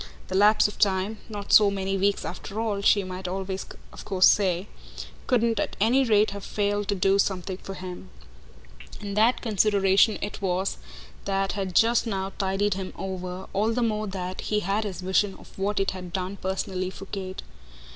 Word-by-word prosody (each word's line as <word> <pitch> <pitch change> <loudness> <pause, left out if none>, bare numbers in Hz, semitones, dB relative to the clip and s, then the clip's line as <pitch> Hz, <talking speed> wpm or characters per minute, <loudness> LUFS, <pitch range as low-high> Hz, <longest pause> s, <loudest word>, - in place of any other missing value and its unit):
The 185 - -3
lapse 210 +3 +5
of 210 - -10
time 200 +2 +1
not 205 -2 -4
so 210 -1 +8
many 195 -1 -2
weeks 200 +1 +1
after 200 +4 -6
all, 215 -3 -1
she 200 0 +4
might 185 0 -6
always 190 +1 -4 0.3
of - - -9
course 185 -1 +4
say 190 -1 +2 0.6
couldn't 235 -3 +2
at - - -2
any 240 +6 +4
rate 215 -2 +3
have 200 0 -7
failed 205 0 -1
to 200 - 0
do 195 +1 +2
something 190 -1 -1
for 195 0 -8
him; 180 - -8 0.9
and 200 -1 -5
that 225 +4 +3
consideration 205 -1 +3
it 205 - -5
was 190 0 -1 0.5
that 195 0 0
had 190 -3 -4
just 230 +1 +4
now 195 -2 -3
tided 195 +1 +1
him 190 -1 -5
over, 185 -1 -5
all 210 +3 +1
the 245 +1 0
more 215 -2 -1
that 185 -1 -5
he 210 0 0
had 200 +3 -1
his 190 -3 -5
vision 190 +2 +1
of - - -16
what 200 +1 0
it 195 - +1
had 180 -2 -8
done 185 +1 -3
personally 185 -1 -2
for 195 +1 -9
Kate. 190 -1 -6
195 Hz, 185 wpm, -26 LUFS, 190-210 Hz, 0.9 s, so